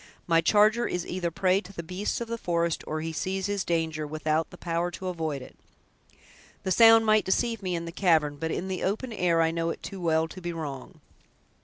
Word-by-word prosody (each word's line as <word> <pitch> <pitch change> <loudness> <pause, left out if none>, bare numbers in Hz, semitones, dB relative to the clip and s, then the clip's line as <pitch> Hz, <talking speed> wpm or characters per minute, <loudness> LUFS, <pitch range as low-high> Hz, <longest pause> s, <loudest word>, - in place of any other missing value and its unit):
My 165 -1 +3
charger 215 +5 +4
is 180 -1 -3
either 180 -1 -2
a - - -3
prey 185 +3 +2
to 195 - -13
the 170 - -6
beasts 185 +7 -3
of 235 - -3
the 230 0 -4
forest, 170 -3 0
or 155 0 -2
he 165 0 -4
sees 190 +4 -2
his 205 -1 -1
danger, 160 -2 -1
without 155 +1 -1
the 180 - -13
power 170 0 -1
to 185 +1 -5
avoid 160 -6 -3
it. - - -14 1.1
The 190 - -2
sound 225 +2 +7
might 215 0 +4
deceive 230 +3 0
me 185 -2 -2
in 170 0 -4
the 170 - -6
cavern, 160 -5 +2
but 160 +2 -3
in 185 - -3
the 190 -1 -3
open 220 +5 -2
air 170 -5 +2
I 160 - +2
know 165 0 -1
it - - -6
too 195 -2 -7
well 160 -1 +2
to 185 - -10
be 175 -1 -4
wrong." 145 -5 -7
175 Hz, 225 wpm, -27 LUFS, 165-195 Hz, 1.1 s, sound